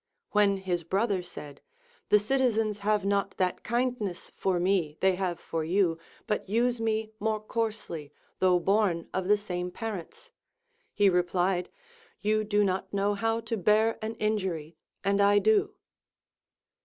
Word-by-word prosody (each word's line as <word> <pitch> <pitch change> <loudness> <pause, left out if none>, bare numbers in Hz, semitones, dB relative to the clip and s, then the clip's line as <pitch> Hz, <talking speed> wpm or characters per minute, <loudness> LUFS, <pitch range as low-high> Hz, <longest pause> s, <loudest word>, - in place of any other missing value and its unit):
When 205 -1 +3
his 180 -3 -2
brother 195 +3 0
said, 145 -5 -10 0.5
The 210 - +7
citizens 220 -2 +1
have 210 0 +1
not 200 0 0
that 185 -1 0
kindness 235 -6 -2
for 185 -2 0
me 175 -4 +1
they 190 0 +3
have 180 -2 -2
for 165 -2 -3
you, 170 0 +1 0.3
but 210 -2 -2
use 235 +2 +1
me 220 -1 -1
more 220 0 0
coarse 220 0 -3
ly, 150 -4 -6 0.3
though 185 -1 +4
born 190 -2 +1
of 185 -1 -1
the 210 +1 +5
same 180 -3 -4
parents, 220 - -7 0.6
he 205 -1 +3
replied. 180 0 +1 0.5
You 215 +1 +1
do 205 0 +2
not 190 -1 -1
know 200 +1 +1
how 225 +2 0
to 225 0 -3
bear 215 +3 +2
an 220 +1 -4
injury, 185 -8 -2 0.3
and 200 +1 +2
I 200 0 +5
do. 415 - +3
200 Hz, 150 wpm, -28 LUFS, 180-220 Hz, 0.6 s, The